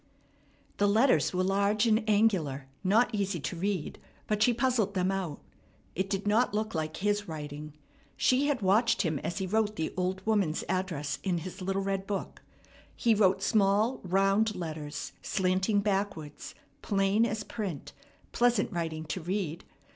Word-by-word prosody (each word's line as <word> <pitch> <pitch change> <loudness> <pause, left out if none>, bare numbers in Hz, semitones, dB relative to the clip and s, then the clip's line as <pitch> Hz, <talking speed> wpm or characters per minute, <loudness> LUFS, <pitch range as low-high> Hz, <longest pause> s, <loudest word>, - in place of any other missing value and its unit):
The 205 - +3
letters 215 - +4
were 185 0 0
large 200 +3 +2
and 220 0 +3
angular, 185 -11 +2 0.2
not 220 +6 +3
easy 195 -4 -1
to 130 +7 -3
read; 185 -2 -2 0.3
but 210 -1 -1
she 245 - +5
puzzled 235 -4 +1
them 185 0 +1
out. 185 -6 -3 0.5
It 190 +2 -2
did 195 0 -2
not 210 +1 +2
look 215 0 -1
like 155 -1 -3
his 205 +1 0
writing. 150 -1 -7 0.4
She 265 +3 +3
had 275 -7 0
watched 220 +6 +3
him 160 -5 -1
as 175 - -4
he 190 - -1
wrote 215 +2 0
the 160 - -3
old 185 +1 -2
woman's 200 -8 +1
address 170 -7 -2
in 185 -3 0
his 185 +3 -7
little 195 +1 -1
red 195 0 -2
book. 200 -2 -4 0.5
He 235 - +3
wrote 195 -3 +3
small, 215 +4 +2
round 195 +3 +2
letters, 155 -4 -5
slanting 190 +2 +1
backwards, 195 -7 -3 0.3
plain 195 +2 +2
as 220 -2 -1
print, 195 -10 -5 0.4
pleasant 240 -3 +2
writing 160 -3 -3
to 160 +4 -4
read. 175 -1 -3
195 Hz, 155 wpm, -29 LUFS, 175-215 Hz, 0.5 s, she